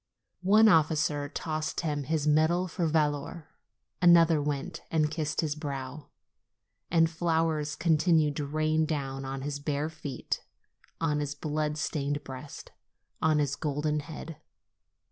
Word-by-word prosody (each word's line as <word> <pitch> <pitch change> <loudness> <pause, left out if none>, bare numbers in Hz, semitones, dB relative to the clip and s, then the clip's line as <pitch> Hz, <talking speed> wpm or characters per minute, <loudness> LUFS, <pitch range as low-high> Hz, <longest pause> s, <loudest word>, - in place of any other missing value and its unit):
One 220 +2 +7
officer 155 -4 +2
tossed 155 -1 -3
him 145 -4 -2
his 155 0 0
medal 160 +4 +3
for 170 -1 -1
valor; 155 +1 -1 0.5
another 170 -3 +6
went 150 +4 -3
and 155 -2 +1
kissed 150 -3 -1
his 155 -3 -1
brow. 140 -1 -6 0.8
And 165 -1 +4
flowers 160 -2 0
continued 160 -2 +3
to 145 -2 -2
rain 155 +1 +1
down 135 -3 -3
on 135 0 -5
his 145 0 -3
bare 145 +1 -2
feet, 145 -5 -5 0.6
on 150 -2 0
his 145 0 -3
blood 150 0 -2
stained 145 -1 -2
breast, 135 +1 -9 0.5
on 155 -1 +3
his 145 -2 +1
golden 150 0 -1
head. 155 +1 -8
150 Hz, 130 wpm, -29 LUFS, 145-160 Hz, 0.8 s, One